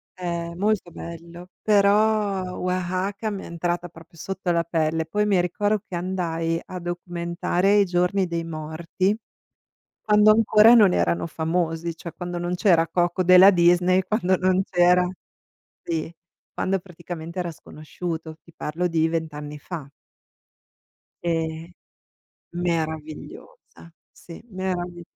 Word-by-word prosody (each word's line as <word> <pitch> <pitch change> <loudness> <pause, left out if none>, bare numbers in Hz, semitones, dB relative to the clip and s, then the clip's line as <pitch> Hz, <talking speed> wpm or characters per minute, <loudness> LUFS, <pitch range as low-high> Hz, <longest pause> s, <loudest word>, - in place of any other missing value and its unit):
eh, 170 -2 -4
molto 205 -2 0
bello, 170 +2 -10
però 205 -2 +2
Oaxaca 185 +4 -2
mi 200 -2 -5
è - - -8
entrata 175 +1 -3
proprio 165 +1 -16
sotto 190 +2 -4
la 170 0 +2
pelle. 160 -1 0
Poi 210 +6 0
mi 195 -3 +3
ricordo 205 +4 +1
che 180 - -6
andai 165 -2 -2
a 185 -1 -7
documentare 175 +2 -1
i 200 - +5
Giorni 180 +2 +1
dei 170 -1 -3
Morti 165 +5 -2 0.9
quando 210 0 +5
ancora 220 +1 +6
non 210 -6 +6
erano 85 0 0
famosi, 165 0 -2
cioè 170 0 -8
quando 175 -1 -5
non 175 +1 -2
c'era 170 -4 +3
Coco 175 +2 0
della 185 +2 +8
Disney, 180 +1 +4
quando 190 -3 +1
non 185 0 +2
c'era 180 0 +3 0.8
sì, 165 0 -3 0.4
quando 190 +1 0
praticamente 170 -1 -8
era 175 -1 -2
sconosciuto. 160 +1 -7
Ti 170 - -19
parlo 165 +4 -2
di 165 -2 +1
20 160 -1 -2
anni 150 0 -7
fa. 150 -2 -8 1.3
E 170 -1 0 1.2
meravigliosa, 165 - -5 0.2
sì, 170 - -12
meravi 180 -2 -4
175 Hz, 125 wpm, -24 LUFS, 165-185 Hz, 1.3 s, della